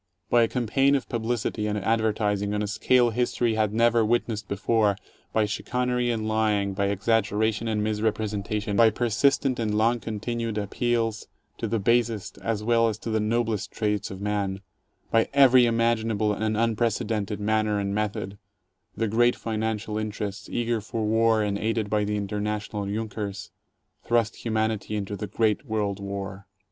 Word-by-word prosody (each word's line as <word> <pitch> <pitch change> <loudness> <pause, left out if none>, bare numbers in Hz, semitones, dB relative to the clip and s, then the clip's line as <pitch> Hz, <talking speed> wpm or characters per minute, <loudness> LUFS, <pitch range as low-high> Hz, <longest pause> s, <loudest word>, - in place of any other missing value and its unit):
By 120 - +5
a 115 - +4
campaign 135 +4 +2
of 135 - -2
publicity 115 -2 -2
and 105 0 -1
advertising 105 -1 0
on 105 - 0
a - - -2
scale 120 +3 +3
history 120 0 0
had 110 -2 +1
never 115 +1 +3
[witnessed 110 -2 0
before, 105 +1 +1 0.4
by 110 -1 +2
chicanery 125 +3 -1
and 110 -2 -1
lying, 105 -2 +1
by 100 +1 0
exaggeration 110 +2 +1
and 105 -1 0
misrepresentation, 105 -1 -1
by 115 +1 +6
persistent 125 +4 +1
and 110 -2 0
long 115 +2 +2
continued 115 0 -3
appeals 115 +2 -1 0.3
to 115 - -2
the 115 +2 0
basest 115 0 0
as 110 -2 -2
well 115 0 +3
as 110 -2 -2
to 115 - -5
the 110 - +1
noblest 110 -1 -1
traits 105 -2 -1
of 95 - -7
man, 100 -2 -2 0.5
by 115 0 +3
every 130 -3 +7
imaginable 115 -2 +1
and 110 +1 -1
unprecedented 110 -2 0
manner 110 0 +1
and 100 0 -2
method, 100 -1 -3 0.6
the 115 - 0
great 120 +3 +3
financial 110 -1 -2
interests, 105 -1 -5
eager 120 -1 -1
for 110 +1 -3
war 110 0 +3
and 100 -1 -1
aided 110 -1 -1
by 105 -1 +2
the 105 0 -1
international 105 0 -3
Junkers, 105 -1 -4 0.5
thrust 115 -1 +1
humanity 110 -2 -1
into 100 0 -3
the 105 +1 -5
great 110 +5 0
world 105 -3 -1
war. 100 -1 -6
110 Hz, 155 wpm, -26 LUFS, 105-115 Hz, 0.6 s, every